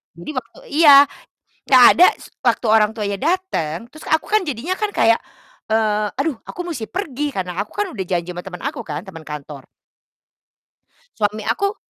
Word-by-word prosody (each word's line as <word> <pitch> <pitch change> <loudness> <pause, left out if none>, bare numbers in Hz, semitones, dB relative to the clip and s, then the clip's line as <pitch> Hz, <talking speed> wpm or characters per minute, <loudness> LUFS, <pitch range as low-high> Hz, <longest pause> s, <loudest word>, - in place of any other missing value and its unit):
Jadi 170 - -8
waktu 255 -5 -6
iya, 285 -2 +8 0.6
nggak 255 -2 +7
ada, 355 - +8
s - - -15 0.2
waktu 240 0 +2
orang 215 -1 +4
tuanya 205 -3 -3
dateng, 240 - -2
terus 310 - -13
aku 315 0 +1
kan 425 -3 +2
jadinya 300 +6 -3
kan 420 -1 -2
kayak, 230 0 +4 0.5
eee, 215 -1 +1
"Aduh, 290 -4 -2
aku - - -11
musti 245 -10 -4
pergi, 295 - -4
karena 180 -3 -4
aku 210 - -8
kan 415 - -1
udah 195 - -5
janji 175 -1 -2
sama 175 0 -8
temen 180 -2 -8
aku 280 -2 -4
kan, 150 0 -5
temen 170 -5 -11
kantor." 145 -2 -8 1.5
Suami 210 0 -2
aku 400 +1 0
225 Hz, 170 wpm, -20 LUFS, 190-310 Hz, 1.5 s, iya